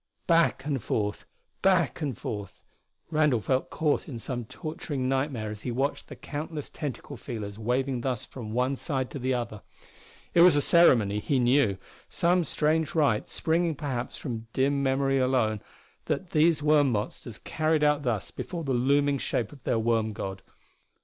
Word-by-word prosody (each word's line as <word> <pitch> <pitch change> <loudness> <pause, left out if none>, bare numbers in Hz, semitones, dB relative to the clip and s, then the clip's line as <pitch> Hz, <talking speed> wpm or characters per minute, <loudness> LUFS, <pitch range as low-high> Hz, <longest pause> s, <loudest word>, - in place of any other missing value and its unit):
Back 165 -5 +3
and 140 -4 -1
forth 105 -1 -2 0.4
back 185 -3 +2
and 140 -7 -2
forth 100 -3 -6 0.5
Randall 150 -6 +3
felt 130 +5 0
caught 150 -2 0
in 125 - -5
some 120 +1 -4
torturing 155 -2 -4
nightmare 130 -5 -1
as 105 -1 -8
he 125 - -4
watched 135 +4 -1
the - - -9
countless 150 0 -6
tentacle 145 -1 -6
feelers 110 -4 -6
waving 125 +2 0
thus 125 -3 -2
from 115 -5 -8
one 125 +4 +1
side 130 -2 -3
to 140 - -5
the 130 0 0
other. 115 -4 -4 0.7
It 170 - +6
was 180 -3 +8
a - - +4
ceremony, 115 -12 +5
he 135 +6 0
knew 120 -5 +3 0.3
some 175 +1 +2
strange 155 +2 0
rite 140 -9 +2
springing 165 0 0
perhaps 130 -4 -4
from 115 -5 -5
dim 140 +1 +2
memory 135 0 +2
alone, 125 -5 +1 0.4
that 185 - -2
these 155 -1 +3
worm 150 -3 +4
monsters 105 +1 -4
carried 155 -1 0
out 150 0 +3
thus 120 -7 -2
before 175 -3 -5
the 135 -3 -1
looming 140 +3 +2
shape 115 -4 -1
of 140 - -14
their - - +1
worm 110 -1 +1
god. 95 -1 -5
135 Hz, 165 wpm, -27 LUFS, 115-150 Hz, 0.7 s, was